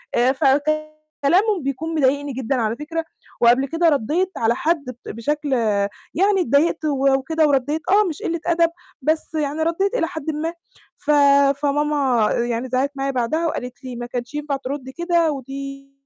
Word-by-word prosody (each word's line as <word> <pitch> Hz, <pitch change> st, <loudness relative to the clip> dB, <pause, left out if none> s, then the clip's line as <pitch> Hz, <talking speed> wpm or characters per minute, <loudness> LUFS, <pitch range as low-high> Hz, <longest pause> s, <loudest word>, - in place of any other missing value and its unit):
آآ 245 Hz, +2 st, +4 dB
فكلامهم 310 Hz, +6 st, +1 dB
بيكون 300 Hz, +5 st, -3 dB
مضايقني 285 Hz, 0 st, +1 dB
جدًا 260 Hz, +1 st, -1 dB
على 225 Hz, -2 st, 0 dB
فكرة، 325 Hz, +4 st, -4 dB, 0.4 s
وقبل 245 Hz, +3 st, +5 dB
كده 330 Hz, +3 st, +2 dB
ردّيت 315 Hz, +8 st, 0 dB
على 230 Hz, +1 st, +2 dB
حد 320 Hz, -1 st, 0 dB
بت 250 Hz, -1 st, -9 dB
بشكل 290 Hz, +6 st, -2 dB, 0.6 s
يعني 390 Hz, +2 st, +3 dB
اتضايقت 315 Hz, +3 st, +2 dB
وكده 275 Hz, +2 st, +2 dB
وردّيت، 290 Hz, +3 st, +1 dB
آه 415 Hz, +2 st, +5 dB
مش 310 Hz, -, -7 dB
قِلّة 335 Hz, 0 st, -1 dB
أدب، 335 Hz, -1 st, +3 dB, 0.3 s
بس 315 Hz, +3 st, -1 dB
يعني 300 Hz, 0 st, -1 dB
ردّيت 385 Hz, +7 st, 0 dB
إلى 330 Hz, -, +1 dB
حدٍ 315 Hz, -1 st, -5 dB
ما. 320 Hz, +3 st, -3 dB, 0.4 s
ف 300 Hz, -, -1 dB, 0.5 s
فماما 285 Hz, -6 st, +2 dB
آآ -, -, -1 dB
يعني 240 Hz, +2 st, -2 dB
زعقِّت 260 Hz, +3 st, 0 dB
معايا 275 Hz, 0 st, -1 dB
بعدها 270 Hz, +7 st, 0 dB
وقالِت 250 Hz, -4 st, -5 dB
لي: 255 Hz, -2 st, -6 dB
"ما 240 Hz, 0 st, -5 dB
كانش 245 Hz, +2 st, -5 dB
ينفع 295 Hz, -1 st, -2 dB
تردي 265 Hz, 0 st, -6 dB
كده، 340 Hz, 0 st, +1 dB
ودي 275 Hz, 0 st, -7 dB
290 Hz, 160 wpm, -21 LUFS, 265-320 Hz, 0.6 s, وقبل